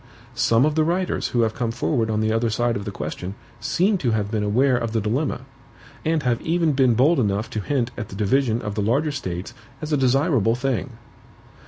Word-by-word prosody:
Some 115 +4 +3
of 155 - +1
the 155 0 +2
writers 175 +3 0
who 120 - 0
have 110 -1 +1
come 120 0 -2
forward 115 0 0
on 110 0 0
the 110 0 +1
other 115 +1 +1
side 120 +2 0
of 100 - -4
the - - -3
question 90 +3 -5 0.2
seem 195 +2 +1
to 125 - 0
have 105 -2 -1
been 110 -2 0
aware 125 +6 +2
of 115 -2 -2
the 115 - +2
dilemma; 120 +8 -1 0.6
and 160 -2 0
have 120 -2 0
even 165 -1 +1
been 130 -3 +3
bold 145 +7 +4
enough 105 0 0
to 110 - -2
hint 125 +1 -1
at 115 -4 -6
the - - -8
division 115 +3 +1
of 105 - -3
the 105 - -2
larger 140 +9 +1
States 90 -10 -5 0.3
as 155 0 -4
a - - +3
desirable 130 - +2
thing. 130 0 -2
120 Hz, 215 wpm, -23 LUFS, 110-140 Hz, 0.6 s, bold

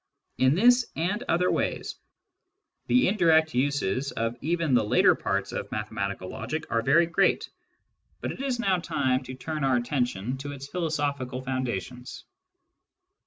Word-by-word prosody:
In 130 +3 +4
this 245 +5 +5
and 190 +7 -1
other 180 +2 +2
ways, - - -2 0.9
the 255 - +4
indirect 165 -5 +3
uses 140 -1 0
of 115 0 -2
*•*' - - -19
even 165 -1 0
the 120 - +4
later 105 - +4
parts - - -2
of - - -5
mathematical 100 -3 -3
logic 115 +11 -4
are 115 - +2
very 140 +8 +4
great; 170 - +2
^ - - -8 0.7
but - - -3
it - - -7
is 260 -3 -1
now 195 -5 +2
time 130 -5 0
to 130 +1 -7
turn 155 +2 -4
our 135 -1 +3
attention 125 -1 -2
to 145 +1 -6
its 140 -1 -8
philosophical 140 -6 -2
foundations. 125 -1 -4
140 Hz, 155 wpm, -27 LUFS, 125-165 Hz, 0.9 s, this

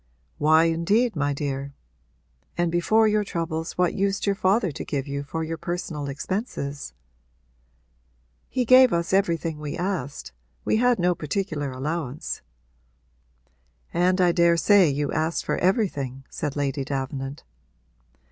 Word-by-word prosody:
'Why 155 +2 +5
indeed, 180 +8 +2
my 145 -1 0
dear? 140 -1 -3 0.8
And 175 -1 +1
before 215 +6 +3
your 210 0 +2
troubles 165 -4 -3
what 180 -1 +2
used 195 0 0
your 200 - +2
father 195 0 +1
to - - -6
give 140 -2 -3
you 140 0 -3
for 160 +3 -4
your 160 0 -4
personal 155 -5 -4
expenses?' 145 - -4 1.5
'He 250 -1 0
gave 255 -1 +7
us 170 +1 -1
everything 170 -5 +1
we 150 -1 -5
asked 170 - -3 0.3
we - - +2
had 245 +1 +3
no 180 0 +2
particular 155 -2 -3
allowance.' 140 +1 -4 1.5
'And 180 +2 +2
I 180 -1 +5
daresay 170 +2 +5
you 145 0 -1
asked 160 +2 -1
for - - -1
everything?' 145 - 0
said 150 -3 -3
Lady 140 -1 -1
Davenant. 135 +1 -4
165 Hz, 130 wpm, -25 LUFS, 145-190 Hz, 1.5 s, gave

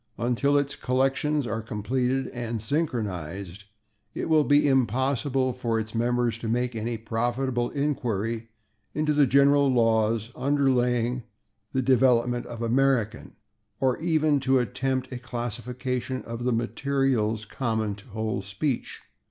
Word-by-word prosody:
Until 125 +4 +2
its 140 0 0
collections 135 +3 +1
are 110 0 -2
completed 125 +5 -1
and 120 -2 -4
synchronized, 100 - -3 0.5
it - - -3
will 155 -1 +5
be 145 0 +4
impossible 130 +1 +1
for 120 -2 -1
its 110 0 -5
members 120 0 0
to 115 - -5
make 120 +1 0
any 115 +1 -2
profitable 120 +3 -1
inquiry 115 -6 -2 0.5
into 150 0 +1
the 145 -2 +4
general 140 +1 +5
laws 115 -1 +2
underlying 125 -3 +1 0.5
the 130 - 0
development 125 -1 +3
of 120 -1 -6
American, 120 -2 +1 0.5
or 130 -2 +1
even 155 -3 +2
to 135 0 +3
attempt 130 +1 -1
a 125 - -5
classification 125 +1 -4
of 115 +1 -6
the 125 - +2
materials 120 -2 0
common 110 -2 -1
to 100 0 -12
the - - -19
whole 110 -2 -2
speech. 100 +8 -3
125 Hz, 130 wpm, -26 LUFS, 115-135 Hz, 0.5 s, will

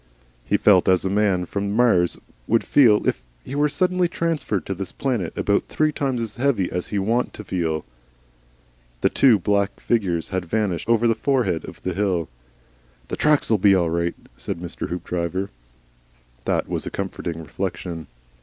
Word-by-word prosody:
He - - +1
felt 95 -4 +5
as 95 0 +3
a 95 - 0
man 100 -3 +2
from 100 +2 -3
Mars 110 -8 +3 0.3
would 115 +1 +3
feel 115 -7 +4
if - - 0 0.2
he - - -7
were 145 +1 +2
suddenly 180 +4 +1
transferred 165 - -2
to 95 - -2
this 95 -1 -6
planet, 120 -11 -2
about 100 0 +1
three 155 0 +1
times 135 -4 -1
as 110 -2 -5
heavy 120 -8 +1
as 90 0 -3
he 105 - -3
was 95 0 -1
wont 120 +2 +1
to 105 - -8
feel. 80 -5 -2 1.2
The - - +3
two 130 -5 +5
little 100 - -2
black 100 +1 0
figures 90 -8 0
had 95 -2 -2
vanished 95 -1 -1
over 115 0 +4
the 115 - +4
forehead 125 - 0
of - - -11
the 95 - -1
hill. 90 -4 0 0.8
"The - - -2
tracks'll 145 -8 +2
be 100 0 +5
all 85 -3 +1
right," 85 0 0 0.2
said - - -4
Mr. 85 0 -5
Hoopdriver. 90 +2 -3 0.9
That - - 0
was - - -3
a - - -1
comforting 95 -3 -4
reflection. 80 +1 -5
100 Hz, 175 wpm, -23 LUFS, 90-120 Hz, 1.2 s, felt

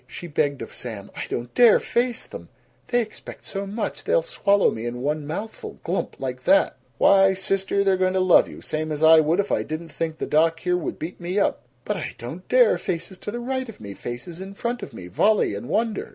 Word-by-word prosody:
She - - -8
begged 145 -4 0
of - - -10
Sam, 110 -5 -7
"I - - -4
don't 120 0 -4
dare 240 -3 +7
face 240 0 -1
them! - - -10 0.4
They 245 -1 +2
expect 215 - -11
so 195 0 -4
much. 210 +4 -4
They'll - - +2
swallow 200 - +2
me 115 +2 -4
in 120 +1 -5
one 150 +1 -1
mouthful 205 +8 -6
glump! 180 +4 -2
like 130 -1 -4
that!" 295 +1 +4 0.2
"Why, 195 -1 +5
sister, 195 +1 0
they're 195 -1 +3
going 185 0 +1
to - - +3
love 185 -1 +5
you - - -11
same 155 0 -3
as 150 +1 -2
I 160 0 +8
would 160 +4 +2
if 205 - 0
I - - +2
didn't 160 +1 -5
think 160 -1 -3
the - - -3
doc 165 +2 +2
here 180 0 +1
would 180 - -3
beat 165 +4 -6
me 180 +3 -3
up!" 205 - +2
"B - - -36 0.2
but - - -1
I - - -5
don't 155 +10 -8
dare! 245 -8 +5
Faces 175 +2 -4
to - - -6
the 240 +3 -4
right 260 +1 -3
of 225 - -11
me, 100 -2 -8
faces 125 - -7
in 195 +1 -8
front 240 +3 -3
of - - -7
me, 100 -6 -9
volley 200 - +2
and 100 +4 -6
wonder!" 220 -1 -1
180 Hz, 235 wpm, -24 LUFS, 155-205 Hz, 0.4 s, I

